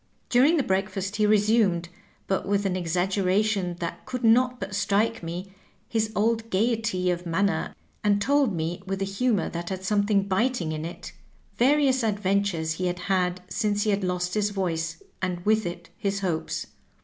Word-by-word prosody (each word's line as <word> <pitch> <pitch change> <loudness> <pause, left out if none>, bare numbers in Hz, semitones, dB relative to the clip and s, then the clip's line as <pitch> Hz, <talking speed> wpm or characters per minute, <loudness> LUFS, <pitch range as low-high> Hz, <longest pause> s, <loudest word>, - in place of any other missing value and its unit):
During 275 +7 +5
the 285 - +2
breakfast 190 0 -1
he 210 -1 +3
resumed, 210 -4 +3 0.4
but 195 0 -1
with 200 0 +1
an 190 - +1
exaggera 185 +3 +1
tion 190 -5 -1
that 170 - -4
could 250 -1 -4
not 250 +2 +4
but 195 0 -5
strike 215 +3 +1
me, 175 +3 -6 0.3
his 220 -1 0
old 225 +1 +1
gayety 215 -3 +1
of 175 0 -3
man 170 +4 +2
ner, 200 - -1 0.3
and 205 -1 +3
told 275 +2 +3
me, 170 0 -3
with 195 0 -2
a - - 0
humor 200 0 0
that 170 0 -4
had 190 -1 -4
something 205 0 +2
bit 225 +7 +1
ing 160 -3 -2
in 155 0 -4
it, 170 - -8 0.5
various 265 0 +4
adventures 200 -6 0
he 180 +3 -1
had 180 0 -2 0.2
had 180 -1 0
since 205 0 0
he 215 - +2
had 200 0 0
lost 180 0 -1
his 210 -1 +1
voice, 165 -5 -2 0.2
and 180 -2 -2
with 215 -2 +3
it 175 0 -7
his 195 -1 -1
hopes. 170 -4 -2
195 Hz, 180 wpm, -26 LUFS, 180-215 Hz, 0.5 s, During